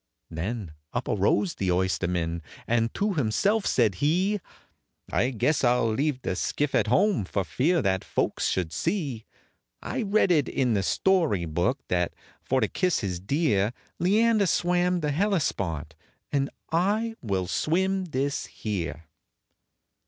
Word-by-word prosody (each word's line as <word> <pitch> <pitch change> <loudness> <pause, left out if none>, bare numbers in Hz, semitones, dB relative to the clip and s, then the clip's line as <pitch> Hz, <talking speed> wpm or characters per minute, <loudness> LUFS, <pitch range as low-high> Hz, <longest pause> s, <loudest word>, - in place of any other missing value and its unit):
Then 95 +3 -4 0.2
up - - -2
arose 105 - +2
the 95 - -2
oysterman, 90 -2 0 0.2
and 115 0 +1
to 205 0 0
himself 190 - +1
said 115 -5 +3
he, 185 +7 +2 0.7
"I 125 - +2
guess 135 +6 +1
I 120 0 +5
'll 115 -2 +1
leave 135 +1 -1
the 95 - -1
skiff 145 +8 -1
at 110 - +2
home, 190 - +3
for 95 +1 -2
fear 145 - +1
that 95 -1 +1
folks - - -1
should 90 -3 -1
see 140 - -2 0.5
I - - -3
read 205 -2 +2
it 150 -5 +3
in 125 -4 +1
the 100 - +2
story 155 - +2
book, 85 - -1
that, 90 -1 0 0.3
for 130 0 0
to - - +2
kiss 180 -6 0
his 90 -4 -3
dear, 105 - +1 0.3
Leander 210 +3 +3
swam 180 +1 +1
the 150 -1 0
Hellespont, 100 - -1 0.4
and 140 -1 +1 0.2
I 205 +7 +1
will 95 -5 -1
swim 190 - 0
this 145 -3 -2
here." 85 -7 -4
130 Hz, 145 wpm, -26 LUFS, -, 0.7 s, I